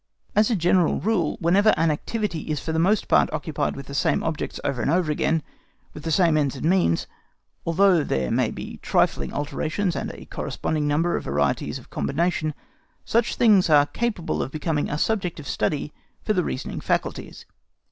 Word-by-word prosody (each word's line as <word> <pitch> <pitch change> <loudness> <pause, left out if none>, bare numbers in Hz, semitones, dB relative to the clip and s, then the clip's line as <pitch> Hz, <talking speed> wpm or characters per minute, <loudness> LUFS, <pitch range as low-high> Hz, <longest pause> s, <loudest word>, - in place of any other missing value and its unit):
As 210 0 +4
a 235 - +2
general 175 -1 +2
rule, 190 -7 0
whenever 195 +6 +4
an 165 0 +3
activity 170 0 -3
is 150 -2 -1
for 160 - -4
the 160 - 0
most 195 +5 +2
part - - +4
occupied 150 -3 -2
with 140 - -8
the 140 - -9
same 140 - +1
objects 160 -2 -3
over 125 -3 -1
and - - 0
over 165 -1 +2
again, 155 +1 0 0.5
with 150 - -9
the 165 - -4
same 165 -1 +3
ends 145 -2 0
and 135 - -5
means, 175 - +2 0.6
although 175 -1 +4
there 65 - -1
may - - +2
be - - -7
trifling - - +1
alterations 160 +5 -2
and - - -3
a - - -11
corresponding 150 -2 -2
number 160 +4 +1
of - - -4
varieties 70 +1 0
of - - -15
combination, 155 0 -1 0.5
such 235 0 +1
things 205 -7 +4
are 145 -2 +6
capable 210 0 -2
of - - -3
becoming 150 +1 -2
a 150 - -2
subject 185 -3 -1
of 145 - -9
study 150 0 -1 0.3
for 215 - +1
the 180 -3 +1
reasoning 130 - -4
faculties. - - -3
160 Hz, 185 wpm, -24 LUFS, 150-185 Hz, 0.6 s, are